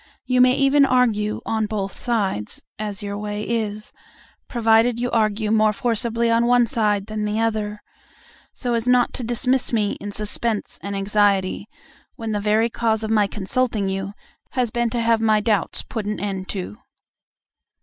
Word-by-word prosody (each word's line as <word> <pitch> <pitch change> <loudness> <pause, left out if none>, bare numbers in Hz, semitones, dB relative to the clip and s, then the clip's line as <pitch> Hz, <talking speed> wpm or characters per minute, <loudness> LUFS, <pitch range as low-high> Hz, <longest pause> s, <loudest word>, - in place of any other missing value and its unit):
You 255 -1 +3
may 255 0 +6
even 275 +1 +4
argue 230 -5 +2
on 220 -1 0
both 200 -3 -3
sides 195 - -2 0.2
(as 205 -2 -4
your 200 0 -4
way 210 0 -4
is), 215 -2 -3 0.5
provided 230 0 +3
you 245 0 -1
argue 215 -1 +1
more 215 -1 +4
forcibly 230 0 0
on 230 +1 +3
one 245 0 +5
side 210 -4 0
than 215 0 -4
the 210 +1 -1
other, 215 -2 -2 0.7
so 245 -2 -3
as 230 0 -1
not 250 -1 +3
to 255 - -3
dismiss 245 +3 +1
me 210 -3 +1
in 205 - -5
suspense 210 +1 -2
and 200 0 -4
anxiety, 200 0 +1 0.5
when 225 -3 -5
the 205 -1 -1
very 215 +3 +2
cause 225 -2 0
of 220 - -2
my 210 -2 +3
consulting 210 +1 -1
you 195 +1 -3 0.4
has 250 -3 0
been 240 0 0
to 235 - -2
have 230 -1 +2
my 215 -1 +3
doubts 210 -1 0
put 220 -3 -5
an 210 - -2
end 195 -2 -4
to. 200 +3 -5
220 Hz, 170 wpm, -22 LUFS, 205-235 Hz, 0.7 s, may